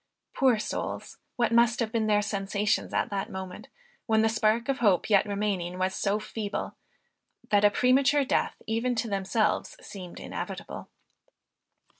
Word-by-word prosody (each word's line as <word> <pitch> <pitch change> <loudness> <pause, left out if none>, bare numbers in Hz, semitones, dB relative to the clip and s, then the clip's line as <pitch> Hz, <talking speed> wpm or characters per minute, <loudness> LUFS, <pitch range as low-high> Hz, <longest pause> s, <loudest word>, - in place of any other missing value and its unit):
Poor 260 -4 +3
souls, 215 - -5 0.2
what 235 -2 +1
must 235 0 +4
have 225 -2 -1
been 225 -1 0
their 210 -1 +3
sensations 205 0 -1
at - - -1
that 195 -1 -2
moment, 190 -1 -7 0.4
when 220 -1 +3
the 225 - +3
spark 220 +1 +1
of 275 -1 0
hope 205 -2 +2
yet 200 0 +5
remaining 200 -4 -2
was 185 0 0
so 200 +1 0
feeble, 215 -1 -5 0.8
that 205 -1 +4
a 205 - +7
premature 270 +5 +3
death - - 0
even 230 +3 0
to 230 +1 -1
themselves 200 +2 0
seemed 185 -3 -9
inevitable. - - -6
215 Hz, 150 wpm, -28 LUFS, 200-230 Hz, 0.8 s, a